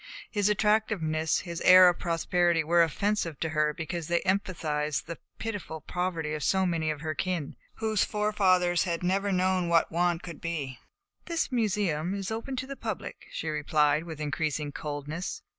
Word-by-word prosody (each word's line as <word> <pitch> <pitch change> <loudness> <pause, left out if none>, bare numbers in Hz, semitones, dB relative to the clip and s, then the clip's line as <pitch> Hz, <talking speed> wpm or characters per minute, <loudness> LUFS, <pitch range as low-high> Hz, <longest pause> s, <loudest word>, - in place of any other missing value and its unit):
His 205 -2 +2
attractiveness, 210 -7 +1
his 170 -1 -6
air 185 0 +9
of 175 - +2
prosperity, 170 0 +1
were 170 +2 +4
offensive 170 -1 0
to 160 - 0
her 155 -1 +1
because 165 0 -5
they 170 0 +1
emphasized 160 -6 -1
the 170 0 -7 0.2
pitiful 205 -8 -5
poverty 165 -1 -3
of 155 - -3
so 190 -1 +2
many 165 -3 0
of 150 -2 -3
her 155 -1 -2
kin 170 -2 -3 0.2
whose 220 -2 +1
forefathers 185 -5 +2
had 170 -1 -2
never 195 +3 +1
known 185 -1 +1
what 165 -1 +3
want 175 0 +1
could 170 -3 -8
be. 145 -7 -4 0.5
"The 335 -2 -1
Museum 195 -7 0
is 195 +1 -4
open 230 +4 -4
to 255 0 -3
the 275 +1 -6
public," 220 -7 -6
she 165 - -5
replied, 150 0 +2
with 160 -3 -7
increasing 150 -1 -2
coldness. 150 +5 -5
175 Hz, 165 wpm, -28 LUFS, 155-195 Hz, 0.5 s, air